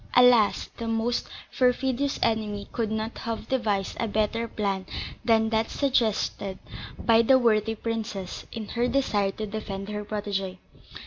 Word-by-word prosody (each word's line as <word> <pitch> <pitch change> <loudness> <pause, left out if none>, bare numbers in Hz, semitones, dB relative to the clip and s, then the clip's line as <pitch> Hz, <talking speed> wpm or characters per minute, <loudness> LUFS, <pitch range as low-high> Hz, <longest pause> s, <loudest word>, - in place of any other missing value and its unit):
Alas! 245 -4 +5
the 230 - -4
most 225 +2 0 0.3
perfidious 260 +2 +1
enemy 210 -2 0
could 230 -3 -1
not 220 +1 -3
have 230 -1 -4
devised 210 -7 0
a 230 - 0
better 215 +2 0
plan 200 -3 -2 0.4
than 225 -1 +3
that 220 0 +1
suggested 220 -7 0 0.4
by 230 -1 +4
the 260 +3 +6
worthy 225 -2 +2
princess 215 -5 -4
in 220 -3 -6
her 240 +1 +1
desire 235 -6 +1
to 215 +3 -4
defend 200 -2 -5
her 210 0 -3
protégée. 200 -3 -3
220 Hz, 140 wpm, -26 LUFS, 205-235 Hz, 0.4 s, the